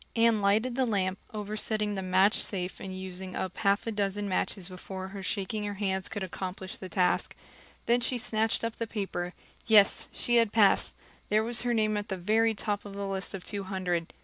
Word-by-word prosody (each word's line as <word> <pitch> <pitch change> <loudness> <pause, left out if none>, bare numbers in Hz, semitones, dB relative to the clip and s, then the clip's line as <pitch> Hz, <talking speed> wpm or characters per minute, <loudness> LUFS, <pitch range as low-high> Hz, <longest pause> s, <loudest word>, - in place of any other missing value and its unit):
Anne 230 -2 +4
lighted 220 +5 +2
the 260 0 +2
lamp, 190 -3 0
oversetting 210 0 -1
the 195 - -2
match 190 +3 +4
safe 185 -2 -3
and 190 -1 -6
using 185 0 -6
up 185 -1 -3
half 200 -1 +2
a 230 - -1
dozen 205 -1 -1
matches 185 -1 -1
before 190 0 -7
her 195 0 -7
shaking 205 +2 -2
hands 190 -2 -1
could 205 -3 -4
accomplish 185 +1 -5
the 185 - -7
task. 180 +1 +1 0.5
Then 240 +1 +3
she 250 +1 +2
snatched 220 -1 0
up 230 -1 -2
the 230 - -2
paper. 190 -4 -3 0.3
Yes, 210 -3 +5
she 240 0 +1
had 230 -3 +4
passed 210 -3 +4 0.3
there 215 +1 +3
was 235 +1 +1
her 240 0 0
name 215 -1 +2
at 205 - -3
the 190 - -3
very 220 +5 +2
top 205 0 -2
of 200 -1 -9
a 200 0 -3
list 195 0 -2
of 185 - -7
two 200 -2 -3
hundred! 180 -3 -2
200 Hz, 200 wpm, -29 LUFS, 190-220 Hz, 0.5 s, Yes